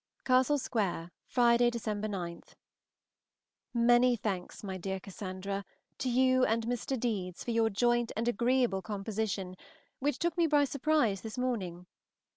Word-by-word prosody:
CASTLE 260 +3 +4
SQUARE, 195 -10 -2 0.2
Friday 240 -1 +4
(December 215 -3 -3
9). 175 -4 -4 1.3
MANY 240 +1 +5
thanks, 200 -5 -4
my 190 -2 -4
dear 190 +1 -3
Cassandra, 195 +1 -5 0.4
to 260 - -1
you 255 +1 +4
and 225 -1 +1
Mr. 245 +2 -2
Deedes 195 -7 -2
for 240 - -1
your 225 -1 +3
joint 240 +3 +1
and 230 +2 -1
agreeable 240 -3 +2
composition, 200 -2 -3 0.4
which 290 +2 0
took 345 0 0
me 335 - +4
by 295 -1 +4
surprise 275 -7 +1
this 220 +1 -7
morning. 190 -9 -2
230 Hz, 135 wpm, -31 LUFS, 195-250 Hz, 1.3 s, MANY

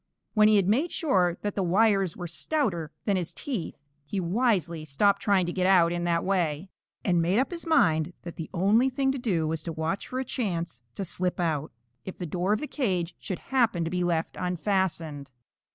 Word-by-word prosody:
When 215 -1 +6
he 215 - +5
had 195 -3 +3
made 270 - +2
sure 185 - +1
that 205 -1 -1
the 200 - -1
wires 195 -1 +2
were 175 - -5
stouter 175 - -1
than 200 -3 +2
his 175 -3 -3
teeth, 240 - -4 0.3
he 190 +7 -3
wisely 180 -4 0
stopped 200 +8 +2
trying 195 -3 +3
to 175 - -3
get 185 -1 +1
out 175 -3 +5
in 175 0 -2
that 170 -1 +1
way, 180 -3 0 0.4
and 175 -3 +3
made 175 +5 +2
up 265 +7 +1
his 335 -1 -6
mind 160 - +3
that 170 - -7
the 160 - -6
only 210 +8 +3
thing 270 +1 +1
to 270 - -3
do 180 -10 0
was 160 0 -2
to 165 - -5
watch 160 +4 -3
for 255 - -3
a 260 - -2
chance 170 - -3
to 195 - -3
slip 180 +1 -1
out, 155 -4 -1 0.3
if 190 - -8
the 180 - -4
door 180 +4 -1
of 210 - +1
the - - -2
cage 185 - -1
should 185 - -4 0.2
happen 230 -9 +3
to 165 - -3
be 180 0 0
left 170 -2 -1
unfastened. 180 -6 -1
185 Hz, 210 wpm, -27 LUFS, 170-210 Hz, 0.4 s, When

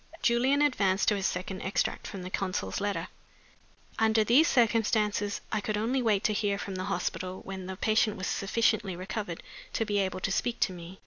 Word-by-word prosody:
Julian 260 +4 +3
advanced 200 -9 +2
to 210 - +2
his 195 -1 0
second 185 +1 -4
extract 190 - -1
from 190 -2 -7
the 185 - -7
consul's 185 - -2
letter: 195 -4 -1 0.9
"'Under 220 0 +4
these 255 +10 +5
circumstances, 215 -3 +2
I 215 - 0
could 210 0 -2
only 240 +5 0
wait 215 -4 +2
to 215 - +2
hear 205 -1 0
from 200 -1 -5
the 185 0 -3
hospital 185 +1 -3
when 190 -1 -7
the 190 - -5
patient 215 0 +2
was 190 - -4
sufficiently 210 -1 +1
recovered 185 -1 -5 0.3
to 225 - 0
be 205 -1 0
able 190 -1 -1
to 195 - -1
speak 235 +4 -1
to 185 - +2
me. 175 +2 -10
205 Hz, 190 wpm, -29 LUFS, 190-220 Hz, 0.9 s, these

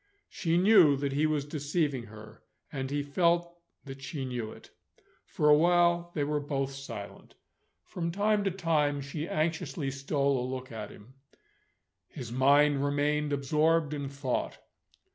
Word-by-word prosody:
She 170 -2 0
knew 180 -7 +6
that 140 0 -2
he 145 +3 +2
was 150 -2 -1
deceiving 145 -3 -2
her; 110 0 -13 0.3
and 135 -2 -4
he 145 +1 -1
felt 170 +3 +1 0.3
that 135 -1 -9
she 140 -1 -5
knew 120 -4 -4
it. - - -14 0.5
For 150 - 0
awhile, 170 +3 +4
they 150 - 0
were 150 +1 0
both 140 -2 -2
silent. 115 -7 -9 0.5
From 170 -1 -4
time 205 +2 +1
to - - +3
time, 155 -6 0
she 150 +3 -5
anxiously 155 -3 -2
stole 140 0 0
a 125 - -4
look 130 -1 -6
at 110 -2 -6
him. 110 +6 -15 0.9
His 125 -6 -8
mind 140 +2 +4
remained 145 +1 0
absorbed 150 +3 +1
in 140 -2 -4
thought. 140 -2 -3
145 Hz, 145 wpm, -29 LUFS, 135-160 Hz, 0.9 s, knew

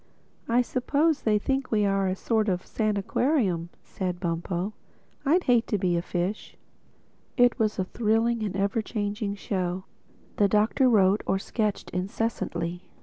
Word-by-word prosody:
"I 240 +2 +4
suppose 285 +5 +1
they 215 -1 +2
think 270 +5 -1
we 210 -2 +2
are 195 -1 +1
a 185 - 0
sort 220 +1 0
of 180 -1 -1
sanaquarium," 210 - 0
said 180 -2 -4
Bumpo—"I'd 190 - -2
hate 240 -2 +3
to 210 - 0
be 180 -2 +1
a 170 - +1
fish." 180 +4 -3 0.8
It 245 0 +4
was 215 -1 +1
a 190 - +1
thrilling 225 +3 +1
and 205 -3 -2
ever 200 +3 +1
changing 205 -1 -3
show. 185 -2 -2 0.5
The 205 - +4
Doctor 215 +6 +3
wrote 200 -2 +4
or 190 - +2
sketched 210 +1 -2
incessantly. 180 -3 -2
210 Hz, 145 wpm, -27 LUFS, 185-230 Hz, 0.8 s, I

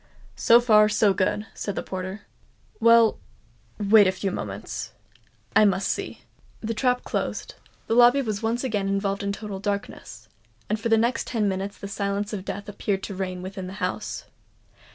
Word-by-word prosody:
"So 235 +1 +6
far, 215 -3 +5
so 210 -1 +3
good," 200 +3 0
said 200 - -4
the - - -3
porter. 185 +2 -5 0.6
"Well—wait 210 - +3
a - - +3
few 190 +1 -3
moments—I 215 - -4
must 195 -1 +1
see." - - -4 0.4
The 230 +1 -3
trap 250 +2 +1
closed—the - - -5
lobby 245 +3 +6
was 215 -4 -3 0.2
again 210 -6 -1
involved 195 0 -1
in 200 0 -1
total 200 -1 -6
darkness; 200 - -5 0.4
and 215 +1 -1
for 230 +1 -2
the 225 - +5
next 235 +3 0
ten 220 -4 0
minutes 195 +1 -3
the 200 - -7
silence 200 +1 -2
of 195 -2 -5
death 205 +1 -5
appeared 200 -1 -2
to 200 - -5
reign 185 -1 -4
within 190 0 -6
the 185 - -7
house. 200 - -3
200 Hz, 155 wpm, -25 LUFS, 195-220 Hz, 0.6 s, So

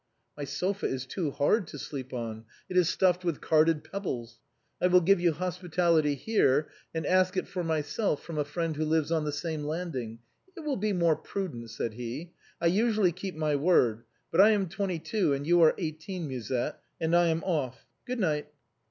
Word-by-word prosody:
" - - -48
My 145 - -2
sofa 185 +9 -1
is 130 -1 -3
too 160 +3 -2
hard 170 +8 +1
to 145 - -8
sleep 135 -2 -6
on, 115 -2 -5 0.2
it 180 - -6
is 180 -3 +4
stuffed 185 -1 +2
with 170 -4 -1
carded 155 -1 +3
pebbles. 120 - -5 0.4
I - - +5
will 180 0 +6
give 195 +2 +4
you 175 -1 +4
hospitality 170 -3 +1
here, 145 - +2 0.2
and 160 -2 -3
ask 185 +2 +3
it - - -1
for 180 -2 -3
myself 160 +2 -1
from 160 -3 -5
a - - +2
friend 160 +2 -2
who 155 - -1
lives 160 0 +1
on 160 -2 +1
the 150 - -1
same 155 +1 -3
landing. 145 -8 -4 0.4
It - - -6
will 300 -3 -1
be 210 +1 0
more 170 -4 +3
prudent," 140 -15 -5
said 115 0 -3
he; 125 +9 -6 0.3
"I 170 - -2
usually 210 +1 +3
keep 180 +1 -6
my 155 -1 0
word, 140 -8 +3 0.3
but 175 - +6
I 210 - +8
am 195 -4 0
twenty 195 -1 -2
two 185 -2 0
and 140 +1 -2
you 175 +2 +4
are 160 - +6
eighteen. 165 +1 -4
Musette, 125 -2 -3
— - - -47
and 165 +1 +1
I 175 0 +5
am 165 0 0
off. 135 -9 -2 0.2
Good 250 0 -2
night." 150 -7 0
165 Hz, 205 wpm, -29 LUFS, 145-180 Hz, 0.4 s, I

